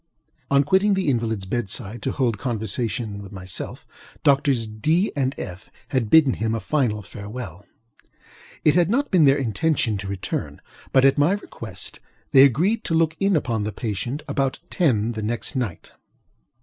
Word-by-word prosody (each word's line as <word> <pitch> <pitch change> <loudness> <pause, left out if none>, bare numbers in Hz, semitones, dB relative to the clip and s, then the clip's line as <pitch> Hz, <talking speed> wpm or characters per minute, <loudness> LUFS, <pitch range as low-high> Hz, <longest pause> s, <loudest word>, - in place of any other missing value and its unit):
On 140 0 +4
quitting 190 +6 +3
the 190 -6 0
invalidŌĆÖs 110 -6 -1
bed 115 0 -2
side 110 +2 -6
to - - -1
hold 120 -6 0
conversation 110 -2 -2
with 100 - -10
myself, 95 -2 -6 0.4
Doctors 140 -5 +3
DŌĆöŌĆö 155 - +1
and 135 -1 0
FŌĆöŌĆö 90 +1 -6 0.3
had 125 -5 0
bidden 150 -3 +6
him 110 +1 -1
a - - -1
final 115 -7 0
farewell. 100 -2 -8 1.0
It 150 - +6
had 175 0 +3
not 275 +6 +1
been 175 -5 +5
their 135 0 +5
intention 125 -3 0
to 100 - -6
return; 95 -1 -4 0.3
but, 130 0 +5
at 135 +1 +4
my 150 +6 +4
request, 205 - -7 0.3
they 135 -2 +8
agreed 180 - +2
to 165 - 0
look 160 -1 +2
in 195 -1 +2
upon 115 -8 0
the 105 - -2
patient 120 +7 -4
about 135 -2 0
ten 120 - +2
the 110 -2 -5
next 115 +5 -3
night. 120 -10 -3
125 Hz, 165 wpm, -23 LUFS, 105-150 Hz, 1.0 s, they